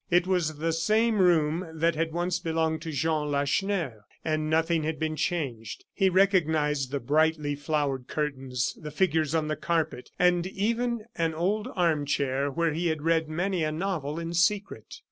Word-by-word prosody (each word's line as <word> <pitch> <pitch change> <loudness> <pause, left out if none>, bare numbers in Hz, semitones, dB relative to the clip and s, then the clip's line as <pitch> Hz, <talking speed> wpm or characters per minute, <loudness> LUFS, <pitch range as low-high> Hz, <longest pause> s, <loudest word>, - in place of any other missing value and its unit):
It 175 0 +4
was 175 -5 0
the 165 +2 -1
same 215 +7 +2
room 170 -2 +3
that 165 +2 +2
had 160 +1 -1
once 175 +1 -1
belonged 160 -2 -1
to 165 -1 -5
Jean 155 +1 0
Lacheneur; 140 - -1 0.2
and 155 -1 0
nothing 160 +1 +2
had 155 0 -2
been 155 0 -2
changed. 140 - -3
He 195 - +3
recognized 160 -7 +2
the 140 +1 -2
brightly 150 +2 +1
flowered 145 -3 -2
curtains, 135 -5 -2
the 150 - -6
figures 155 -1 +1
on 155 -1 +1
the 155 - -1
carpet, 160 -4 -2
and 180 0 +3
even 230 +3 -1
an 165 -1 +1
old 205 +7 0
arm 165 -6 +1
chair 140 0 0
where 165 +3 0
he 170 +3 -1
had 160 -2 -1
read 165 -1 +2
many 175 +2 -1
a 155 - 0
novel 160 -3 -2
in 170 0 -4
secret. 190 - 0
160 Hz, 170 wpm, -27 LUFS, 150-175 Hz, 0.2 s, It